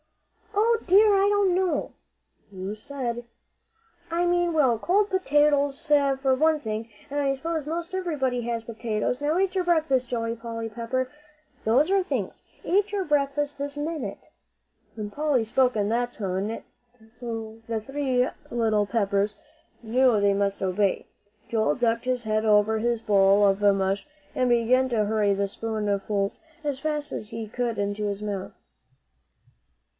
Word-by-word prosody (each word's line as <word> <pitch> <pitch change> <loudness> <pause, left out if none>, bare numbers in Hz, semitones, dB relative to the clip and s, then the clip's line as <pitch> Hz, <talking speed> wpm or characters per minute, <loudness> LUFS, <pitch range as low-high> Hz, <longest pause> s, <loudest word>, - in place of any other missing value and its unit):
"O 455 +2 +3
dear, 410 +3 +6
I 395 +1 +4
don't 405 -3 +3
know." 360 -4 0 0.6
"You 190 +1 -5
said 240 +1 -4 0.5
" 445 -7 -30
"I 350 - +3
mean 350 0 +2
well, 265 -8 +3
cold 400 - +2
potatoes, 295 -4 +2
for 275 -2 +3
one 310 +3 +3
thing. 220 -2 -4 0.2
I 280 -1 +1
s'pose 320 +1 -3
most 340 +3 -4
everybody 295 -10 -1
has 230 -1 -3
potatoes. 230 +2 -2
Now 300 +3 +1
eat 385 0 +1
your 375 -2 +1
breakfast, 310 -8 +1
Joey 230 -1 -2
Pepper. 230 +2 -4 0.5
Those 260 - +3
are 390 0 +4
things. 365 - -4 0.2
Eat 405 +2 +2
your 400 -2 -1
breakfast 290 -1 0
this 285 +1 -3
minute!" 295 -8 -5 0.6
When 210 -2 -5
Polly 290 -2 +1
spoke 250 +3 +2
in 205 -1 0
that 240 +2 0
tone, 200 +2 -3 0.6
the 225 -1 -5
three 265 -3 0 0.2
little 220 -3 +1
Peppers 200 -1 0 0.5
knew 240 0 +3
they 200 0 +3
must 200 0 -1
obey. 190 +1 0 0.4
Joel 215 -10 +1
ducked 230 0 0
his 255 -1 0
head 215 0 0
over 215 0 +3
his 235 0 0
bowl 200 -1 +4
of 195 0 +2
mush, 195 +3 +2 0.3
and 255 -1 +1
began 245 +2 +3
to 220 -4 +1
hurry 205 -1 +2
the 200 0 0
spoonfuls 205 -2 -2 0.2
as 285 -3 -2
fast 300 0 -2
as 210 - -5
he 225 -1 -5
could 235 0 -2
into 205 +1 -2
his 200 0 -3
mouth. 200 -2 -4
240 Hz, 145 wpm, -26 LUFS, 215-295 Hz, 0.6 s, dear